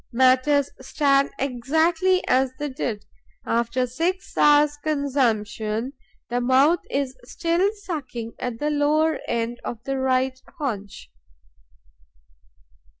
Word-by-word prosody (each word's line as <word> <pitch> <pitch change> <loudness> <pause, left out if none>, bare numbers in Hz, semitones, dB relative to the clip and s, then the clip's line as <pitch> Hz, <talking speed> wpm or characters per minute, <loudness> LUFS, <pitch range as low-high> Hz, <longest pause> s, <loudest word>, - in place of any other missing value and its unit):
Matters 260 +3 +3
stand 275 0 +2
exactly 320 +8 +1
as 260 0 +3
they 295 0 -3
did: 230 -5 -4 0.4
after 235 +2 0
six 335 +9 -3
hours' 295 0 +5
consumption, 250 -6 -1 0.3
the 245 +1 -1
mouth 270 +7 +4
is 275 -2 -2
still 340 +8 0
sucking 265 - -6
at 245 -2 -3
the 300 +5 -1
lower 300 +1 +2
end 235 +1 -2
of 230 -1 -6
the 270 0 -2
right 260 0 0 0.2
haunch. 205 - -5
265 Hz, 105 wpm, -23 LUFS, 245-300 Hz, 0.4 s, hours